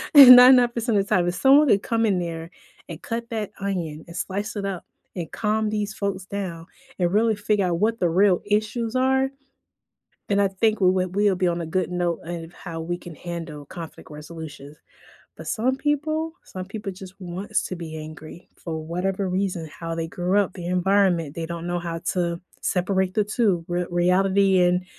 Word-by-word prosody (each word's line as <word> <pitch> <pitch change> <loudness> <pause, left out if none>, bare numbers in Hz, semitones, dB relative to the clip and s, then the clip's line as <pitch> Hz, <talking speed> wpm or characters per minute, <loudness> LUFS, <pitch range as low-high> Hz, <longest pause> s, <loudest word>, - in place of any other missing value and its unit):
99% 250 -3 +8
of 200 0 +1
time, 175 -1 +2
if 175 - -1
someone 275 +5 +5
had 200 -2 +3
come 230 -1 +1
in 195 -3 +2
there, 165 -1 -5 0.4
and 165 -1 -8
cut 235 +1 -4
that 215 -3 -3
onion, 170 -6 -3
and 170 - -11
slice 205 +3 -3
it 200 -1 -3
up, 190 -3 -4 0.3
and 170 -3 -5
calm 215 0 0
these 210 0 -2
folks 200 -2 -3
down, 185 -4 -5 0.3
and 175 0 +1
really 220 +1 +3
figure 205 -2 0
out 175 - 0
what 225 +2 +1
the 175 - +2
real 185 +2 +3
issues 220 +3 -1
are, 265 +1 +2 1.0
and 200 0 +3
I 200 - +3
think 215 +3 0
we 185 - +5
would 185 0 -1
we 205 0 +3
would 185 - 0
be 180 - +2
on 170 0 -1
a 165 - -4
good 180 +3 -1
note 175 -2 -1
of 170 0 -6
how 165 -3 -7
we 175 +2 -3
can 175 -2 -10
handle 165 -4 -7
conflict 165 0 -10
resolutions. 150 -1 -9 0.6
But - - -9
some 250 +4 0
people? 310 +3 -1
Some 185 -1 -7
people 205 0 -6
just 190 0 -11
wants 185 +2 -3
to 185 - -5
be 165 -2 -7
angry, 155 +2 -10
for 160 -2 -5
whatever 185 +3 -2
reason. 180 -3 -2
How 165 -1 -5
they 165 0 -3
grew 180 +3 -1
up, 195 -3 0
the 175 -2 -7
environment, 180 -4 +2
they 165 -1 -3
don't 170 0 -5
know 175 0 -1
how 170 -1 -4 0.2
to 170 -2 -1 0.2
separate 190 0 0
the 210 - +3
two, 205 -6 0
r 175 0 -1
reality 190 +2 +3
and, 180 +1 +2
185 Hz, 190 wpm, -24 LUFS, 170-210 Hz, 1.0 s, 99